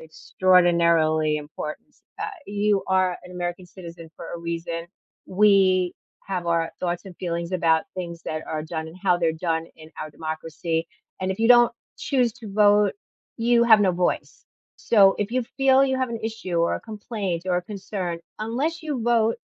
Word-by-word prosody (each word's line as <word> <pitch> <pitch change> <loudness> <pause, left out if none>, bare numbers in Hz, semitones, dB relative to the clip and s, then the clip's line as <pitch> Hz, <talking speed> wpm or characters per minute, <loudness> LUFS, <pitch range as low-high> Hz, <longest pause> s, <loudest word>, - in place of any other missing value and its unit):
extraordinarily 165 -2 +2
importance, 150 0 -8 0.2
ah, - - -2 0.2
you 205 0 +1
are 185 -1 +1
an 180 - -11
American 175 0 -4
citizen 170 -2 -11
for - - -9
a 170 - -5
reason. 170 0 -4 0.4
We 185 -2 +4 0.3
have 180 -3 -3
our 165 -1 +1
thoughts 175 -1 -2
and 180 -3 -11
feelings 170 -1 -3
about 165 -3 +2
things 170 -2 -6
that 155 0 -4
are 155 -1 -3
done 160 0 -5
and 160 +2 -11
how 185 -3 +3
they're 165 -2 +1
done 165 0 -2
in 155 0 -14
our 155 - -6
democracy, 160 +1 -4 0.3
and 185 0 -1
if 190 - -8
you 225 - +3
don't 240 -1 +7 0.3
choose 250 -4 +1
to 215 -4 -10
vote, 205 0 +4 0.4
you 235 0 +3
have 220 -2 +7
no 195 -2 +4
voice. 180 0 -2 0.3
So, 195 -4 +5
if 210 +2 -2
you 255 0 +1
feel 270 0 +5
you 265 -1 0
have 260 -1 0
an 230 -1 -5
issue 220 -5 -4
or 170 - +2
a - - -9
complaint 210 -5 -4
or 180 -1 +1
a 180 - -1
concern, 190 -3 -5 0.2
unless 270 +10 -2
you 285 -6 -3
vote 230 -1 +2
185 Hz, 175 wpm, -24 LUFS, 170-215 Hz, 0.4 s, don't